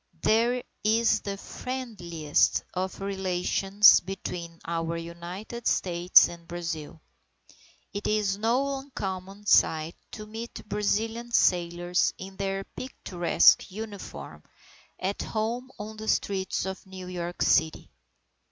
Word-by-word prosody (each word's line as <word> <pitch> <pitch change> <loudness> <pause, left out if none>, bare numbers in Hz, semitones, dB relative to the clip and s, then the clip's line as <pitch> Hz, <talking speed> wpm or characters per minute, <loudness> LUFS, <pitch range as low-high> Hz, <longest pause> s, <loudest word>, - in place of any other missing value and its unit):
There 240 +3 +3 0.2
is 220 0 +3
the 200 -1 -4
friendliest 195 - -1
of 185 +1 -3
relations 195 +1 +4
between 175 -2 -6
our 165 0 -2
United 175 +8 -6
States 175 0 +5
and 170 -1 -11
Brazil. 165 -2 -5 0.9
It 205 0 -3
is 210 -2 +1
no 255 +6 0
uncommon 195 -6 -6
sight 160 -4 +3 0.2
to 215 - -7
meet 225 0 -8
Brazilian 225 +3 -1
sailors 175 -3 +2
in 190 +1 -9
their 195 0 -2
picturesque 185 -9 +2
uniform, 205 0 -8 0.6
at 195 +2 -2
home 230 +4 -2
on 215 0 -7
the 220 0 -7
streets 190 -3 0
of 190 0 -5
New 190 -1 -8
York 175 -1 -3
City. 160 0 +2
195 Hz, 110 wpm, -27 LUFS, 175-220 Hz, 0.9 s, States